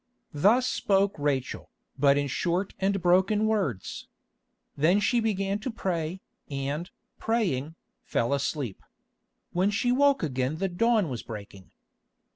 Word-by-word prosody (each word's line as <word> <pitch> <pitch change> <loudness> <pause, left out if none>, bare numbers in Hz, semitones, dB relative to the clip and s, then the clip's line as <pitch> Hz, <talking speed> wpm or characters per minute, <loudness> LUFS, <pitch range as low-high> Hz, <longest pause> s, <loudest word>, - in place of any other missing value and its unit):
Thus 210 - +4
spoke 200 -4 +2
Rachel, 140 -3 -2 0.3
but 140 0 +4
in 145 - +1
short 175 +7 -1
and 195 +1 +1
broken 190 +4 +3
words. 195 - -2 0.7
Then 170 +8 +3
she 240 +3 +2
began 200 -2 0
to 235 - -4
pray, 185 -5 -3 0.3
and, 145 +4 -3 0.3
praying, 170 - -1 0.3
fell 115 +4 0
asleep. 140 -5 -2 0.7
When 185 +3 +2
she 225 +4 +1
woke 280 -2 +3
again 130 -1 -1
the 195 +3 -1
dawn 220 +2 +2
was 125 -5 -4
breaking. 100 -4 -10
180 Hz, 125 wpm, -27 LUFS, 140-205 Hz, 0.7 s, Thus